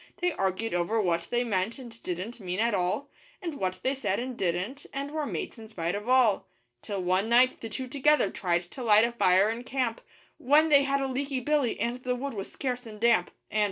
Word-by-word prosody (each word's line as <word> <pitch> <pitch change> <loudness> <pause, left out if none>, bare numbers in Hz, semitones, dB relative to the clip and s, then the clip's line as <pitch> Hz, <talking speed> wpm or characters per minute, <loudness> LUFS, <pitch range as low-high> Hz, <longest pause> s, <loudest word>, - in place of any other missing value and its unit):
They 355 0 +1
argued 195 - -1
over 175 +6 +1
what 170 -4 0
they 240 0 +1
meant 210 0 -1
and 235 -4 -11
didn't 185 +7 -5
mean 185 -1 -4
at 230 0 +2
all, 190 +10 -1 0.3
And 335 -7 -5
what 185 -1 -2
they 265 - +2
said 205 -8 -1
and 250 +1 -4
didn't 190 +9 -2
and 280 +1 -4
were 305 -1 -2
mates - - -5
in 220 - -10
spite 175 -5 -3
of 210 +4 -4
all. 250 -6 +4 0.3
Till 195 -3 -4
one 185 +4 +1
night 250 +2 +4
the 225 - -5
two 260 +4 -4
together 280 -4 +3
tried 175 -1 0
to 265 - -8
light 215 -1 +6
a 235 - -1
fire 195 -2 +4
in 235 +2 -5
camp, 250 -3 -2 0.4
When 300 +5 +4
they 280 -2 +6
had 275 0 +1
a 270 - 0
leaky 270 +1 -2
billy 280 -2 0
and 240 +2 -2
the 250 0 -1
wood 275 +2 -4
was 195 -3 -6
scarce 250 -2 -3
and 215 -1 -10
damp. 225 -6 +3 0.2
And 215 - 0
235 Hz, 225 wpm, -28 LUFS, 195-265 Hz, 0.4 s, light